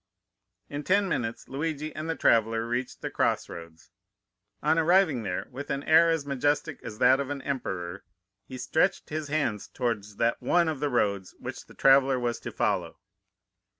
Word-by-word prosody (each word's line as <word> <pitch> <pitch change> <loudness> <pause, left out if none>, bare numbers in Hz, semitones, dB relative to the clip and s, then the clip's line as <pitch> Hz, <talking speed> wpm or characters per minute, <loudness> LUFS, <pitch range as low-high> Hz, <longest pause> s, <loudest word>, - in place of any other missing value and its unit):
In 145 0 -5
ten 200 +3 +2
minutes 115 -10 -3
Luigi 155 +2 -3
and 155 +1 -5
the 165 - 0
traveller 115 -3 +2
reached 120 +2 -3
the - - -3
cross - - 0
roads. 85 0 -11 0.7
On 160 - +3
arriving 165 -5 +3
there, 90 -4 -3
with 140 +3 -7
an 140 +1 -2
air 165 +1 +6
as 165 -3 0
majestic 145 +2 -1
as 105 - -8
that 130 +3 +5
of 140 -1 -3
an 140 -2 -4
emperor, 95 -10 -4 0.4
he 130 - -7
stretched 165 +8 0
his 155 -1 -3
hand 140 -9 0
towards 105 -4 -2
that 115 +2 0
one 175 -1 +3
of 155 -4 -2
the 145 0 0
roads 100 -6 0
which - - -8
the - - -16
traveller 135 -1 +5
was 120 -1 -2
to 120 - -6
follow. 90 -6 -1
135 Hz, 175 wpm, -27 LUFS, 115-155 Hz, 0.7 s, air